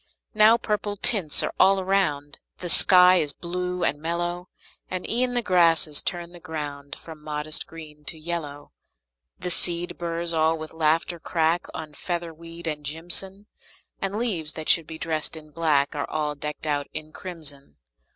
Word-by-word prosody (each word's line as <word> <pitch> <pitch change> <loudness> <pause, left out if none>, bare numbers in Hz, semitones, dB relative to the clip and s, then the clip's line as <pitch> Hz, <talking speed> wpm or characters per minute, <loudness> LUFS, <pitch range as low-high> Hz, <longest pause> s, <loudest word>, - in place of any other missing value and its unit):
Now 215 +2 +6
purple 210 -2 -2
tints 195 -8 +1
are - - -2
all 195 0 +6
around; 185 -7 0 0.2
The 175 - -5
sky 180 +1 +8
is 150 -4 0
blue 180 0 -3
and 145 -2 0
mellow; 175 +2 -3 0.4
And 185 -1 -4
e'en 245 +2 +1
the 240 - +2
grasses 165 -5 +3
turn 175 -1 -3
the 175 - -12
ground 145 -3 -6
From 160 -2 -12
modest 150 +1 -3
green 155 -2 -12
to 160 - -4
yellow. 155 -3 -6 0.7
The 180 - -2
seed 175 0 +3
burrs 170 0 -1
all 160 0 +2
with 155 0 -8
laughter 160 +2 +1
crack 165 +1 0
On 155 -1 -7
featherweed 170 0 -6
and 150 -2 -3
jimson; 175 +6 -2 0.6
And 195 +1 -1
leaves 180 -10 -1
that 155 -1 -5
should 165 -2 +4
be 160 - -7
dressed 160 -1 -2
in 155 -1 -12
black 150 -3 +1
Are 145 - -3
all 150 -1 -1
decked 150 +1 -6
out 145 -2 -1
in 155 0 -6
crimson. 155 -6 -8
165 Hz, 160 wpm, -25 LUFS, 155-180 Hz, 0.7 s, sky